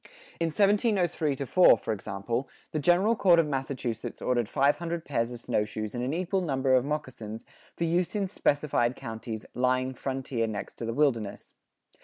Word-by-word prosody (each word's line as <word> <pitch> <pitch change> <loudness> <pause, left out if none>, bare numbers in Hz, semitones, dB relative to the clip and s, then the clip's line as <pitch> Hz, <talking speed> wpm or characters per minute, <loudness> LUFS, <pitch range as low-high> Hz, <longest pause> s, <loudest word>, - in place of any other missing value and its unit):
In 165 - +1
1703 190 - +2
4, 140 +7 +5
for 110 - -3
example, 110 +5 -3 0.2
the 155 - -1
General 180 +9 +3
Court 180 -5 +5
of 165 - +4
Massachusetts 135 -5 -3
ordered 120 -3 0
five 140 +2 +3
hundred 170 -1 -4
pairs 115 -4 -1
of 120 -1 -8
snowshoes 105 0 -2
and 120 0 -3
an 130 - -1
equal 185 +4 0
number 135 -5 +1
of 130 -1 +5
moccasins 130 -7 -5 0.3
for - - -1
use 175 +3 0
in 200 -2 0
specified 145 -8 +1
counties 110 -1 -6
"lying 130 +1 +1
Frontier 130 -3 -2
next 105 -2 -6
to 115 - -3
the 115 - -2
Wilderness." 115 -9 0
135 Hz, 165 wpm, -28 LUFS, 115-170 Hz, 0.3 s, 4